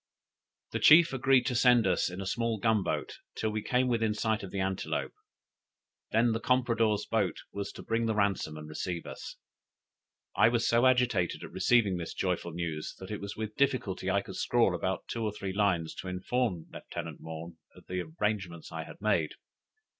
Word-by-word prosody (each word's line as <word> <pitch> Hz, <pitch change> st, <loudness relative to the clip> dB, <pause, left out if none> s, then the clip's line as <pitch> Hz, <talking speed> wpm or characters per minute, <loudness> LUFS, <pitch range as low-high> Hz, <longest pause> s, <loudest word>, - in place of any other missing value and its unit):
The -, -, -1 dB
chief 165 Hz, 0 st, +7 dB
agreed 135 Hz, 0 st, +3 dB
to -, -, 0 dB
send 120 Hz, -2 st, +5 dB
us 90 Hz, -1 st, +2 dB
in 90 Hz, +2 st, -6 dB
a -, -, -4 dB
small 115 Hz, +3 st, -1 dB
gun 110 Hz, 0 st, +2 dB
boat -, -, -3 dB, 0.2 s
till 110 Hz, -, -1 dB
we 110 Hz, 0 st, -2 dB
came 125 Hz, +3 st, +1 dB
within 115 Hz, -3 st, +1 dB
sight 110 Hz, 0 st, 0 dB
of 100 Hz, -, -7 dB
the 100 Hz, -, -4 dB
Antelope; 95 Hz, 0 st, -2 dB, 1.0 s
then 115 Hz, +2 st, +3 dB
the 115 Hz, -, 0 dB
compradore's 115 Hz, -4 st, +2 dB
boat 105 Hz, -5 st, 0 dB
was 100 Hz, 0 st, -4 dB
to -, -, -9 dB
bring 115 Hz, 0 st, 0 dB
the 110 Hz, -, 0 dB
ransom 100 Hz, -7 st, 0 dB
and 75 Hz, 0 st, -8 dB
receive 85 Hz, +2 st, -4 dB
us. -, -, -8 dB, 1.0 s
I -, -, +6 dB
was 120 Hz, -1 st, +1 dB
so 120 Hz, +2 st, +4 dB
agitated 125 Hz, -8 st, +2 dB
at -, -, -8 dB
receiving 105 Hz, -7 st, +3 dB
this 85 Hz, -, -5 dB
joyful 90 Hz, -2 st, -1 dB
news, 80 Hz, -2 st, -4 dB
that 95 Hz, +2 st, -9 dB
it 105 Hz, -, -4 dB
was 100 Hz, 0 st, -6 dB
with 110 Hz, -1 st, -4 dB
difficulty 125 Hz, -9 st, 0 dB
I 100 Hz, +1 st, +2 dB
could 95 Hz, -, -8 dB
scrawl 115 Hz, -6 st, +3 dB
about 95 Hz, +2 st, -2 dB
two 115 Hz, -, -3 dB
or 105 Hz, -, 0 dB
three 100 Hz, -2 st, -4 dB
lines 95 Hz, -5 st, +1 dB
to -, -, -6 dB
inform 90 Hz, 0 st, -1 dB
Lieutenant -, -, -7 dB
Maughn 80 Hz, +1 st, -8 dB, 0.2 s
of -, -, -16 dB
the 90 Hz, 0 st, -3 dB
arrangements 90 Hz, 0 st, -3 dB
I 80 Hz, -1 st, -5 dB
had -, -, -12 dB
made. 95 Hz, -8 st, +1 dB
105 Hz, 190 wpm, -30 LUFS, 90-115 Hz, 1.0 s, chief